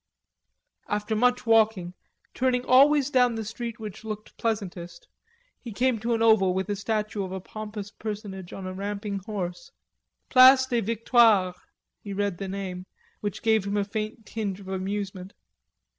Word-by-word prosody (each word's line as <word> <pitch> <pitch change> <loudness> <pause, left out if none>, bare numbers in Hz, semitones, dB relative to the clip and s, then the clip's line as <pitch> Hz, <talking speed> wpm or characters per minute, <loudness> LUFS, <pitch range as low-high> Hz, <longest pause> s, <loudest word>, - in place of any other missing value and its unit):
After 210 +1 -1
much 250 +3 +2
walking, 220 -6 +3 0.4
turning 250 -1 0
always 280 +2 +5
down 250 -3 +3
the 220 -1 -4
street 230 +1 -6
which 215 -1 -8
looked 215 -1 -7
pleasantest, 180 -6 -4 0.5
he 235 - -8
came 245 +2 +1
to 230 +2 0
an 225 - 0
oval 195 -5 +4
with 190 0 -1
a 205 - 0
statue 210 0 -2
of 185 - -6
a 190 - -4
pompous 210 +1 -7
personage 205 -4 -6
on 190 - -7
a 185 - -5
ramping 200 +1 -4
horse. 195 +5 -5 0.6
"Place 260 +1 +8
des 240 -3 0
Victoires," 225 -3 +3 0.5
he 200 - -6
read 200 -3 -2
the 195 - -4
name, 190 -1 -5 0.3
which 205 -1 -5
gave 220 -3 +3
him 200 +1 -1
a 205 - +2
faint 215 +1 -5
tinge 205 -4 -4
of 195 - -12
amusement. 190 0 -4
210 Hz, 160 wpm, -26 LUFS, 195-230 Hz, 0.6 s, Place